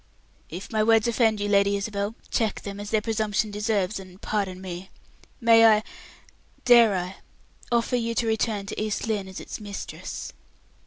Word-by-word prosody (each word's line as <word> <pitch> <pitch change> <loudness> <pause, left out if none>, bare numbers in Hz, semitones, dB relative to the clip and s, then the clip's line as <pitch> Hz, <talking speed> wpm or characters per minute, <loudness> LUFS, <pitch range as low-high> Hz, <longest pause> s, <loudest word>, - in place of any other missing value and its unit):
"If 180 +5 -8
my 215 -1 +1
words 225 +1 +4
offend 225 -2 +2
you, 205 - -1
Lady 200 0 +3
Isabel, 200 +1 -3 0.2
check 220 -3 0
them, 200 0 -7
as 205 0 -6
their 215 -1 +2
presumption 220 -1 0
deserves, 210 -1 -1
and 185 -1 -12
pardon 195 -4 -2
me. 185 0 -7 0.5
May 230 -2 +6
I 215 -1 +6 0.8
dare 235 -4 +7
I 180 +1 -3 0.6
offer 240 +1 +2
you 230 -1 -2
to 235 - +1
return 220 -2 0
to 200 - -5
East 215 +1 -2
Lynne 210 -4 -2
as 190 - -8
its - - -7
mistress?" 205 -2 -7
210 Hz, 165 wpm, -25 LUFS, 200-225 Hz, 0.8 s, dare